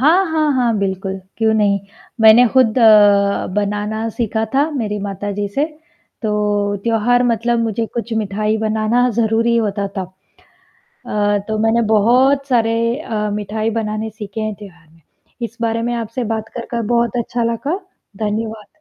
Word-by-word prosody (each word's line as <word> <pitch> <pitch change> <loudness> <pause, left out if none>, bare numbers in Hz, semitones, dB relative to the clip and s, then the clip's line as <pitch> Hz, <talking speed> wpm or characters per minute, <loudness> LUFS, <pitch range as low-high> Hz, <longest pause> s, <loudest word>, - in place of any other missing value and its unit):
हाँ, 330 +8 +4
हाँ, 310 -1 +2
हाँ, 240 -4 +1
बिल्कुल। 190 0 -2 0.2
क्यों 220 -1 +2
नहीं? 205 -2 +2 0.4
मैंने 225 +3 +7
खुद 255 -2 +3
अ, 205 -3 +5
बनाना 210 +2 -1
सीखा 220 -1 -1
था 285 +4 +2
मेरी 220 -8 -3
माताजी 205 +1 -3
से, 285 - +2 0.6
तो 205 -1 0
त्योहार 235 +2 +2
मतलब 235 0 +1
मुझे 225 0 -1
कुछ 235 -1 -4
मिठाई 215 0 -1
बनाना 220 +3 +1
ज़रूरी 230 +1 +1
होता 205 -3 0
तब। 185 -1 -4 0.9
अ, 205 0 +1
तो 215 0 -1
मैंने 225 +2 +2
बहुत 250 +6 +3
सारे 230 -3 +2 0.3
अ, 210 -7 -2
मिठाई 210 +2 -2
बनाने 220 0 -3
सीखे 210 0 -7
हैं 215 -1 -2
त्योहार 175 -6 -14
में, 165 +1 -24 0.4
इस 230 -1 -5
बारे 230 0 0
में 240 +1 -1
आपसे 230 +2 -3
बात 220 0 -5
कर, 235 - -5
कर 235 -1 -2
बहुत 235 -1 +1
अच्छा 235 +1 -2
लगा। 290 - -2 0.5
धन्यवाद। 215 0 -3
220 Hz, 155 wpm, -18 LUFS, 210-235 Hz, 0.9 s, मैंने